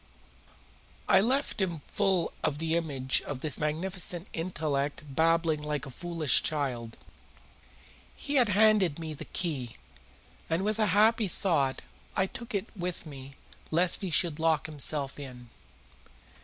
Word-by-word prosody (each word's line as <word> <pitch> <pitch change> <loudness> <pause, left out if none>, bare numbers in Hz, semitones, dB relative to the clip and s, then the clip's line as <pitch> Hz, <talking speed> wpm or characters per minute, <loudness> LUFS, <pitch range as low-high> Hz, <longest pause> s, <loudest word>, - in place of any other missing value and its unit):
I 190 - +6
left 260 +1 0
him 170 -5 -1
full 195 -4 0
of 145 - 0
the 160 +1 0
image 140 -6 +1
of 140 -3 -6
this 150 -2 -1
magnificent 175 +3 0
intellect 155 -5 -2
babbling 160 +2 +2
like 150 -2 -3
a 135 - -8
foolish 165 +1 +1
child. 125 -7 -2 1.2
He 285 - -2
had 235 - +2
handed 205 -5 +4
me 160 -2 -5
the 155 +1 -8
key, 140 -11 -1 0.7
and 165 +4 +1
with 215 +1 0
a 215 - +3
happy 215 +3 +4
thought 155 -7 0 0.3
I 190 - +3
took 235 +3 -7
it 200 - -1
with 180 -2 -4
me 140 -2 -9 0.4
lest 170 +2 +2
he 190 - -1
should 165 -1 +2
lock 160 -1 +2
himself 145 -2 -2
in. 125 -4 -9
160 Hz, 140 wpm, -29 LUFS, 145-185 Hz, 1.2 s, I